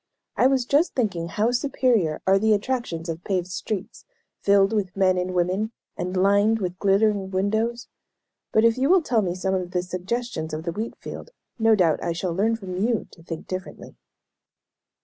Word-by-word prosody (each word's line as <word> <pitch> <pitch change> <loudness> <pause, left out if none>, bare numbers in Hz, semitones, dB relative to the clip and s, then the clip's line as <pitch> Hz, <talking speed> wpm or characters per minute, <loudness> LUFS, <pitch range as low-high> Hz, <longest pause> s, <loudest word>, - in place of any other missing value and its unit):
I 255 - +4
was 265 -2 +1
just 290 +7 +2
thinking 195 -9 -1
how 215 +7 0
superior 240 - +1
are 195 +1 +4
the 220 +1 +3
attractions 205 -7 -3
of 165 +1 -5
paved 185 -3 -1
streets, 200 +3 -5 0.4
filled 200 +1 +3
with 195 -3 -2
men 190 -1 +4
and 180 0 -2
women, 185 +6 0 0.2
and 180 +1 -3
lined 200 +4 +4
with 180 -2 -4
glittering 200 0 +2
windows. 220 +5 -1 0.6
But 220 +1 +4
if 230 +2 +3
you 270 +3 +2
will 370 -1 +5
tell 235 -6 +2
me 180 -3 -2
some 190 +1 -1
of 185 -2 -1
the 180 -1 -1
suggestions 180 -2 -3
of 155 - -5
the 170 - -2
wheat 215 +7 -4
field, - - -8 0.3
no 225 0 +5
doubt 170 -6 +2
I 170 - -1
shall 175 +1 -2
learn 215 +6 +1
from 190 -5 -6
you 230 -1 0
to 165 - -16
think 165 -1 -7
differently." 185 0 -7
195 Hz, 185 wpm, -24 LUFS, 180-225 Hz, 0.6 s, will